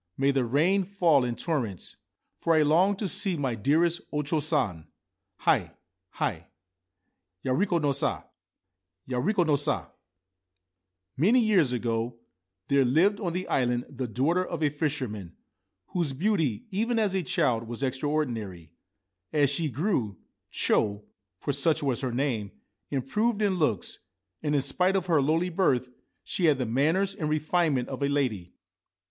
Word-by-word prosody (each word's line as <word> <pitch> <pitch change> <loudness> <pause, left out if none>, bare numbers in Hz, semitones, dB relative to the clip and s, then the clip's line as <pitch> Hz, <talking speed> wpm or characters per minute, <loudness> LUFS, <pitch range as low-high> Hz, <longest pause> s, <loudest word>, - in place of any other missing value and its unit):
May 140 +1 +3
the 135 -2 +1
rain 165 +11 +2
fall 175 -8 +3
in 120 -1 -2
torrents! 120 - -3 0.4
For 165 - +2
I 155 - +5
long 175 +7 +3
to 200 +1 -3
see 195 -2 0
my 135 -4 -1
dearest 160 +9 +2
O 150 -1 -1
Cho 155 +2 0
San. 120 - -1 0.5
Hi, - - +2 0.4
Hi, - - -3 1.0
Ya 130 - -1
re 195 +10 +2
ko 175 -3 +1
no 145 -3 +1
sa! 135 - -1 0.8
Ya 125 -1 -2
re 195 - +1
ko 195 -5 +2
no 155 -3 +2
sa! 145 - -1 1.2
Many 210 - +4
years 190 - +3
ago 115 -1 -2 0.5
there 140 -1 +4
lived 170 +11 +3
on 175 -6 -2
the 185 +1 -3
island 125 -1 0
the 130 -2 -4
daughter 145 - +1
of 170 -3 -4
a 145 - +2
fisherman 130 - -3 0.5
whose 170 -6 -1
beauty 160 - 0
even 230 +5 0
as 210 -4 +1
a 190 - +1
child 115 -8 0
was 120 +3 -5
extra 130 +2 -1
ordinary. 110 - -3 0.6
As 145 -3 +3
she 155 +2 -1
grew, 130 - -1 0.3
Cho 105 0 0 0.2
— 95 -2 -58
for 145 - -1
such 150 +3 +2
was 135 -2 0
her 130 -2 -2
name 120 -5 -1 0.2
— - - -55
improved 205 - 0
in 190 -3 +1
looks, 110 - 0 0.4
and, 150 -1 0
in 140 - +3
spite 185 +7 +1
of 190 -2 0
her 165 -5 +3
lowly 165 +6 +1
birth, 130 -9 +1 0.3
she 180 - -1
had 150 -4 +4
the 130 - -1
manners 160 - +1
and 155 -6 -3
refinement 155 -3 +1
of - - -6
a 140 - +1
lady. 120 -11 -1
145 Hz, 165 wpm, -27 LUFS, 125-175 Hz, 1.2 s, I